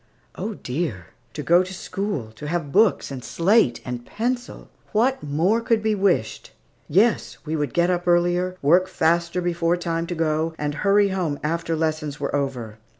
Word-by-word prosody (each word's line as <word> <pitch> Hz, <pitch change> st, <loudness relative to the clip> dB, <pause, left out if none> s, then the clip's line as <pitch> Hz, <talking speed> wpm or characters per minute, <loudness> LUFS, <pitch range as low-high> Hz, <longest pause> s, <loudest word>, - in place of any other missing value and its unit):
Oh, 220 Hz, -, -4 dB
dear! 125 Hz, -, -4 dB, 0.2 s
to -, -, -5 dB
go 175 Hz, +2 st, +5 dB
to 185 Hz, 0 st, -5 dB
school, 190 Hz, -, -4 dB
to 150 Hz, +7 st, -9 dB
have 165 Hz, -3 st, -2 dB
books 205 Hz, -5 st, +3 dB
and 130 Hz, -2 st, -6 dB
slate 185 Hz, -, +2 dB
and 125 Hz, -1 st, -5 dB
pencil! 245 Hz, -, -4 dB, 0.3 s
What 250 Hz, +5 st, +2 dB
more 165 Hz, +10 st, +1 dB
could 230 Hz, -2 st, +1 dB
be 220 Hz, 0 st, +2 dB
wished? 190 Hz, -, 0 dB, 0.4 s
Yes, 205 Hz, +8 st, +2 dB
we 155 Hz, +1 st, -2 dB
would 150 Hz, -2 st, -1 dB
get 175 Hz, +1 st, +2 dB
up 175 Hz, 0 st, -2 dB
earlier, 175 Hz, +1 st, +2 dB
work 175 Hz, +6 st, +4 dB
faster 170 Hz, 0 st, +1 dB
before 175 Hz, 0 st, +1 dB
time 165 Hz, -1 st, -2 dB
to 175 Hz, -, -3 dB
go, 160 Hz, 0 st, 0 dB
and 150 Hz, 0 st, -2 dB
hurry 200 Hz, +5 st, +3 dB
home 175 Hz, -6 st, -1 dB
after 165 Hz, +1 st, -1 dB
lessons 155 Hz, -2 st, -2 dB
were 140 Hz, 0 st, -2 dB
over. 125 Hz, -6 st, -3 dB
170 Hz, 170 wpm, -23 LUFS, 150-190 Hz, 0.4 s, go